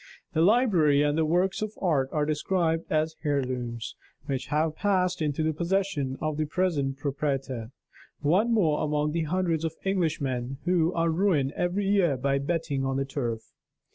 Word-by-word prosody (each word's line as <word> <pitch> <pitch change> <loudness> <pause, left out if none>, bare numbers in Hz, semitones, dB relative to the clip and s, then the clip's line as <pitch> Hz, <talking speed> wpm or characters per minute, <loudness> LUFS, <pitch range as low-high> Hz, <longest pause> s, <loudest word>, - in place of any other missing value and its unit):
The 160 - +2
library 175 - +4
and 145 0 +1
the 160 -1 +1
works 180 +5 +1
of 215 0 -3
art 145 -8 +1
are 150 -1 0
described 165 +2 0
as 155 +1 +1
heirlooms, 125 -5 -2 0.3
which 135 -3 -3
have 155 +1 0
passed 185 -3 +1
into 150 0 0
the 160 0 +1
possession 170 -5 -1
of 155 -1 -2
the 155 - 0
present 145 -5 0
proprietor 135 -5 -2 0.5
one 185 +11 +2
more 165 -10 +2
among 150 0 0
the 165 0 -1
hundreds 165 -1 0
of 160 -1 -2
Englishmen 145 -9 -1
who 175 -2 +2
are 165 0 +1
ruined 160 -6 +2
every 180 +3 0
year 190 -8 +3
by 140 +2 +1
betting 150 -2 -1
on 135 0 -1
the 135 - 0
Turf. 120 -5 -4
155 Hz, 165 wpm, -27 LUFS, 140-175 Hz, 0.5 s, library